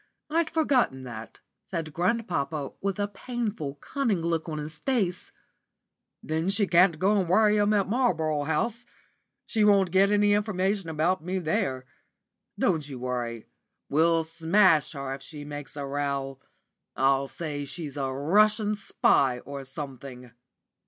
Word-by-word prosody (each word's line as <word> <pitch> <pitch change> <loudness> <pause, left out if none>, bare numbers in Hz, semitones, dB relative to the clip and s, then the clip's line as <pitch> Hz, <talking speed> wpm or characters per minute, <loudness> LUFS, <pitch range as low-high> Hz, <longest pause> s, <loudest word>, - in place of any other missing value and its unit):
I'd 330 0 +1
forgotten 260 - +1
that," 115 -3 -9 0.3
said 165 -4 -4
grandpapa, 170 - -1
with 195 0 -1
a 205 0 0
painful, 210 - -4
cunning 215 - -1
look 165 -1 -1
on 155 - -4
his 150 0 -7
face, 200 - -1 0.9
"then 160 +3 -1
she 200 +1 +3
can 180 0 +5
go 195 +6 +2
and 180 -3 -1
worry 210 +2 +4
'em 205 0 +3
at 200 -2 +2
Marlborough 160 - +1
House. 225 +10 -1 0.6
She 220 - 0
won't 200 -4 +4
get 195 +2 +4
any 205 0 +4
information 200 -3 0
about 160 +2 0
me 185 +2 -2
there. 160 - -1 0.7
Don't 150 -3 0
you 135 - -6
bother. 120 -2 -3 0.5
We'll 165 +2 +3
smash 165 0 +3
her 140 -2 -4
if 135 - -8
she 145 +1 -9
makes 145 0 -8
a 140 - -3
row. 140 -1 -3 0.6
I'll 135 +1 +2
say 145 -1 -5
she's 145 0 -6
a 135 -2 -2
Russian 210 - +3
spy 140 -10 +2
or 140 -1 -7
something. 130 -2 -8
165 Hz, 145 wpm, -27 LUFS, 140-205 Hz, 0.9 s, can